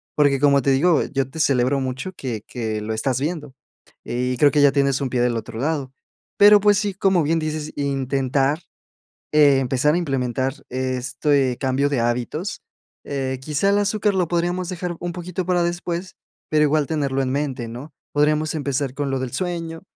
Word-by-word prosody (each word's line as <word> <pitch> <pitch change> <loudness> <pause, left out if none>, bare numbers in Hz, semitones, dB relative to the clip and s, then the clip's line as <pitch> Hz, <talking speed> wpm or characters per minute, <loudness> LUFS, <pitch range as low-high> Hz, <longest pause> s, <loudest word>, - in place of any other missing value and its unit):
Porque 145 -2 +3
como 140 -1 +4
te 140 - +3
digo, 155 +4 +3
yo 135 -2 -2
te 160 - -9
celebro 135 -2 +2
mucho 130 +7 -4
que 125 - -5
que 110 -3 -3
lo 110 +1 -3
estás 130 +3 0
viendo, 150 -3 -3 0.5
y 125 +1 -2
creo 145 +1 +6
que 145 -1 +2
ya 140 - +6
tienes 140 -1 +1
un 135 -2 -2
pie 125 -1 0
del 120 -1 +1
otro 110 0 -6
lado, 140 -2 -2 0.4
pero, 205 0 +8
pues 205 0 +4
sí, 205 -3 -2
como 190 -3 +2
bien 165 +3 +1
dices, 155 -1 -3
intentar 135 +1 0 0.7
empezar 140 0 +4
a - - +2
implementar 130 -4 -1 0.2
este 130 +1 0
cambio 135 +1 +1
de 140 -4 0
hábitos, 125 - -2 0.4
eh, 135 -2 -3
quizá 150 +7 0
el 200 - +3
azúcar 205 0 +1
lo 185 -2 +1
podríamos 175 +1 -1
dejar 180 -2 -4
un 175 0 -4
poquito 180 0 -5
para 180 -1 +2
después, 175 +1 -3 0.3
pero 155 -1 +4
igual 150 -1 +1
tenerlo 140 -4 0
en 130 - -1
mente, 135 -4 -2
¿no?, 130 +5 -9 0.2
podríamos 150 +1 +1
empezar 140 -2 -2
con 145 -1 -2
lo 135 - -1
del 130 -2 -3
sueño, 165 +1 -4
145 Hz, 180 wpm, -22 LUFS, 130-165 Hz, 0.7 s, pero